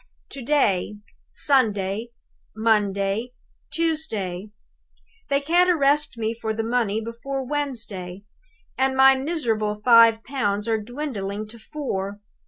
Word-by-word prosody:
"To 275 - -8
day; 215 -7 +1 0.3
Sunday; 215 -5 +1 0.5
Monday; 210 +1 +1 0.4
Tuesday. 220 - -2 0.8
They 280 0 +2
can't 350 +5 +3
arrest 295 -5 +2
me 225 0 -1
for 220 -1 -4
the 225 - -2
money 225 -2 0
before 265 +4 -5
Wednesday. 225 -10 -4 0.6
And 265 0 +1
my 270 0 +8
miserable 230 -8 -1
five 230 -2 +7
pounds 210 -6 -1
are 220 -1 0
dwindling 215 -5 -5
to 230 +1 -12
four! 205 -7 -4
230 Hz, 110 wpm, -23 LUFS, 210-275 Hz, 0.8 s, my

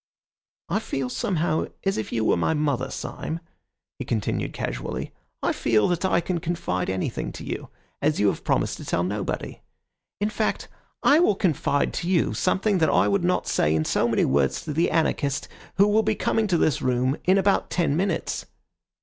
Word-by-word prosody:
"I - - 0
feel 135 -2 -3
somehow 160 +2 0 0.2
as 195 0 +1
if 110 - -4
you 110 -1 0
were - - +4
my 85 - +1
mother, 145 -4 0
Syme," 165 - -5 0.6
he - - -2
continued 110 -4 -1
casually. - - -4 0.3
"I - - +2
feel 110 -3 +2
that 175 0 0
I 185 -2 +2
can 175 0 -2
confide 155 - -2
anything 95 0 -2
to - - -8
you, - - -5 0.3
as 150 +1 +1
you 105 - +3
have - - -4
promised - - 0
to - - -9
tell 85 - 0
nobody. 100 +2 -3 0.6
In 210 +1 0
fact, 215 - -1 0.4
I 295 +2 +6
will 275 - +4
confide 150 -6 +1
to 175 - -3
you 180 -3 +2
something 190 +1 +1
that 160 - +3
I - - +3
would 200 -3 +1
not 180 +1 +1
say 75 +1 +2
in 80 0 +1
so - - +2
many - - +2
words 70 0 +1
to 155 - -4
the 165 +4 +2
anarchists 145 -4 0 0.3
who 200 +1 +5
will 210 +1 +4
be 220 0 0
coming 225 +1 +1
to 180 -3 +2
the 155 -4 +3
room 130 +2 +1
in 185 +2 +5
about 195 0 +2
ten 165 -5 +1
minutes. 180 -1 -1
160 Hz, 190 wpm, -25 LUFS, 125-190 Hz, 0.6 s, I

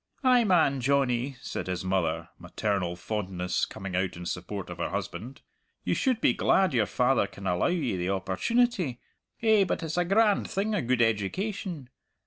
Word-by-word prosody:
"Ay 250 -2 +5
man, 160 - +3
Johnnie," 130 -1 +1
said - - -5
his 90 0 -3
mother, 85 -3 0
maternal 100 -5 -2
fondness 90 -2 -2
coming 95 -2 -6
out 95 -1 -1
in 90 - -7
support - - -4
of - - -8
her - - -1
husband, 125 +5 -5 0.4
"you - - 0
should 255 -4 +1
be - - +3
glad 190 -5 +3
your 115 -5 +2
father 125 -4 +2
can 100 - -11
allow 90 -1 +1
ye 160 - 0
the 90 0 -2
opportunity. 130 - 0 0.4
Eh, 220 -3 +5
but 180 - -2
it's 160 +1 -3
a 175 - +2
grand 205 +2 +3
thing 205 +3 -1
a 205 - +1
gude 120 -1 +2
education! 145 - -2
125 Hz, 170 wpm, -28 LUFS, -, 0.4 s, Ay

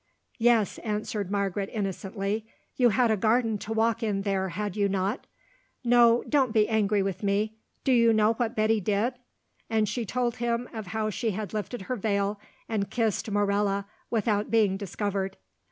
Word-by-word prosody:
"Yes," 230 -3 +3
answered 210 -2 -3
Margaret 200 -1 -1
innocently, 200 +1 -3 0.3
"you 245 -2 +4
had 235 +2 +3
a - - +4
garden 225 +1 +2
to 215 - -7
walk 225 +1 +1
in 205 -3 -1
there, 195 -2 0
had 205 +2 -3
you 200 -1 +1
not? 195 +4 -1 0.6
No, 240 -1 +5
don't 270 -5 +2
be 215 -1 +4
angry 210 -2 +2
with 195 -2 -3
me. 210 +2 0 0.2
Do 270 - +2
you 230 -2 +5
know 215 0 +4
what 230 0 -2
Betty 215 0 +2
did?" 210 +5 0 0.6
And 220 -1 +2
she 230 +4 -2
told 240 +2 -1
him 240 +1 -1
of 220 -4 -6
how 215 +3 -1
she 225 +2 -1
had 215 -3 -5
lifted 215 0 -4
her 255 - -3
veil 200 -1 -1 0.3
and 210 -3 -1
kissed 225 -2 0
Morella 200 -1 +1 0.2
without 215 -2 0
being 215 -4 +3
discovered. 195 0 -3
215 Hz, 170 wpm, -27 LUFS, 200-230 Hz, 0.6 s, No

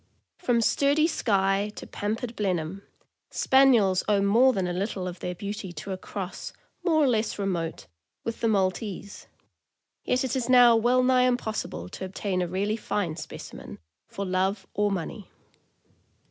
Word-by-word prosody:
From 235 -2 +2
sturdy 285 +6 +3
Skye 200 - +1
to - - -8
pampered 225 +3 -4
Blenheim, 185 -2 -2 0.5
Spaniels 240 -9 +4
owe 205 -1 +3
more 225 +7 +5
than 190 -6 -1
a 175 - -2
little 190 0 -2
of 180 -1 -6
their 180 +1 -4
beauty 200 0 -5
to 170 +5 -7
a 190 - -3
cross, 195 -1 -6 0.3
more 320 -4 +3
or - - +4
less 225 -3 0
remote, 175 - -2 0.4
with 230 - -5
the 230 - +2
Mal 195 -4 +3
tese; 200 -1 -8 0.8
yet 250 +1 +1
it 260 -1 -1
is 255 -2 -2
now 245 -2 +7
well 245 +3 +3
nigh 255 0 +4
impossible 220 - -2
to - - -7
obtain 185 0 -2
a 180 - -1
really 200 +5 -1
fine 190 -7 -2
specimen, - - -9 0.3
for 200 - -5
love 190 +1 0
or 205 +1 +1
money. 195 +2 -5
205 Hz, 160 wpm, -26 LUFS, 190-240 Hz, 0.8 s, now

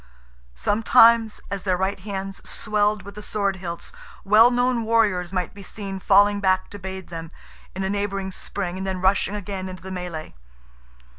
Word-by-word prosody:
Sometimes 225 - +4
as 200 -1 -3
their 185 -1 0
right 190 +2 -1
hands 195 0 -6
swelled 210 -1 0
with 200 +1 -10
the 210 - -9
sword 200 -2 -1
hilts, 170 - -6 0.3
well 215 +4 +7
known 245 -1 +1
warriors 210 -6 +2
might 180 -3 -2
be 200 - -11
seen 195 -1 -6
falling 205 +2 +4
back 190 -1 +1
to 205 - -8
bathe 190 -1 -7
them, 165 -1 -7 0.5
in 190 - -2
a 190 - -1
neighbouring 195 -1 -2
spring, 185 -1 -5
and 190 - -4
then 190 -1 -2
rushing 190 +2 +2
again 195 -2 -5
into 185 -2 -9
the 190 - -7
melee. 180 -4 -6
195 Hz, 170 wpm, -23 LUFS, 185-205 Hz, 0.5 s, well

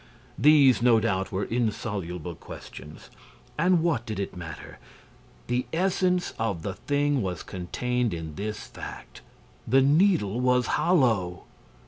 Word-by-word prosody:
These, 140 -6 +6
no 120 -2 +5
doubt, 95 -4 -1
were 100 0 -1
insoluble 100 -7 -3
questions; 75 -1 -11 0.4
and 170 +1 +3
what 160 -9 +1
did 110 -4 -5
it 100 - -4
matter? 85 -3 -9 0.7
The 125 +1 -1
essence 180 +1 +1
of 100 -8 -2
the 95 - -3
thing 145 +3 0
was 95 -3 -3
contained 120 +6 -2
in 80 -2 -5
this 105 +4 -5
fact: - - -10 0.5
The 130 +3 +4
Needle 145 - +3
was 125 0 +2
hollow. 115 - +1
115 Hz, 125 wpm, -26 LUFS, 95-145 Hz, 0.7 s, These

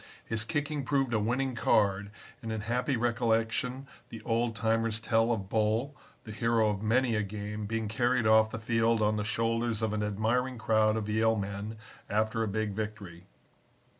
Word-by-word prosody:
His 115 -1 -1
kicking 145 +2 -2
proved 135 -2 0
a 110 - +2
winning 125 +5 0
card 100 -3 +2 0.3
and 115 - -5
in 110 -1 -3
happy 125 +4 -1
recollection 120 +2 0 0.2
the 115 - -8
old 115 0 0
timers 115 0 0
tell 115 +1 +2
of 100 -5 -2
Bull, 110 +7 0 0.3
the 110 - -9
hero 115 0 +2
of 100 -1 -2
many 120 +3 +2
a 105 - +1
game, 105 +1 -5
being 110 0 -2
carried 120 +2 +1
off 110 0 +5
the 115 - -5
field 115 0 +1
on 105 0 +2
the 105 - -1
shoulders 115 +1 -1
of 110 -1 0
an 105 - -1
admiring 115 +5 0
crowd 110 -1 +2
of 105 -2 -3
Yale 110 +1 +2
men 100 +2 -4 0.3
after 110 +2 0
a 110 - 0
big 105 +1 -1
victory. 100 -4 -6
110 Hz, 175 wpm, -30 LUFS, 105-115 Hz, 0.3 s, off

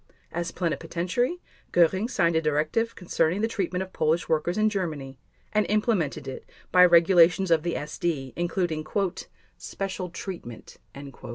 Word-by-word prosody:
As 170 0 -3
Plenipotentiary, 180 - -2 0.3
Göring 185 +6 +3
signed 170 -8 +1
a 160 - +3
directive 155 +10 0
concerning 175 +1 0
the 225 - +2
treatment 190 -4 -2
of 190 - -12
Polish 160 +2 +1
workers 165 +3 0
in 215 0 +3
Germany 155 -10 -3 0.3
and 215 0 +3
implemented 195 - 0
it 130 - -6 0.3
by 180 0 +7
regulations 175 +1 +5
of 165 -2 +4
the 170 +1 -2
SD, 150 -3 -3
including 175 -2 -1 0.8
"special 190 -2 -4
treatment." 170 - -8
175 Hz, 130 wpm, -26 LUFS, 160-190 Hz, 0.8 s, by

